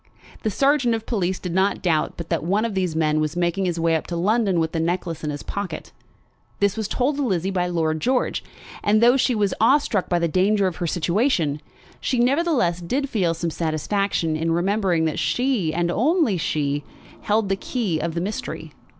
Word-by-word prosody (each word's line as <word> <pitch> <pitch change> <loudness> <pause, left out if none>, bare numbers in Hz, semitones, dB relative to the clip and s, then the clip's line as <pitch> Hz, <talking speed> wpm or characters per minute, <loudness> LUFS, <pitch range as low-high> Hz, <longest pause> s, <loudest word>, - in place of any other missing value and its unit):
The 220 - 0
sergeant 270 +1 +2
of 225 0 -6
police 190 -5 -1
did 180 -2 -5
not 190 +2 +1
doubt 160 -4 +1
but 170 -1 -7
that 165 -2 -1
one 200 +6 +1
of 230 - -2
these 185 -4 -1
men 155 -1 +2
was 155 +1 -2
making 175 +2 0
his 175 -2 -1
way 165 0 +2
up 160 - -2
to 175 - -4
London 195 +1 +2
with 160 -1 0
the 165 - -2
necklace 165 -1 -2
in 150 - -2
his 145 -1 -5
pocket. 200 -2 -5 0.7
This 200 -1 +2
was 220 -2 -2
told 270 +6 0
to - - -1
Lizzie 190 -5 0
by 180 -2 0
Lord 160 -2 0
George; 250 +7 0 0.4
and 210 +1 +3
though 240 +3 +6
she 255 -2 +2
was 205 -3 +1
awe 260 +6 +6
struck 225 -10 -2
by 175 - +2
the 170 0 +1
danger 195 +4 +2
of 185 -2 -2
her 175 - -2
situation, 170 - +1 0.4
she 255 - -1
nevertheless 250 - +2
did 265 +11 -2
feel 180 -8 +1
some 165 0 -2
satisfaction 165 +1 -1
in 165 +1 -1
remembering 180 -1 +1
that 155 - -1
she 195 - +1
and 170 +2 0
she - - 0
only 185 - +1 0.4
held 210 -1 +1
the 195 - +2
key 195 -5 -2
of 165 0 -3
the 170 - -1
mystery. 205 +4 -5
185 Hz, 205 wpm, -23 LUFS, 165-220 Hz, 0.7 s, though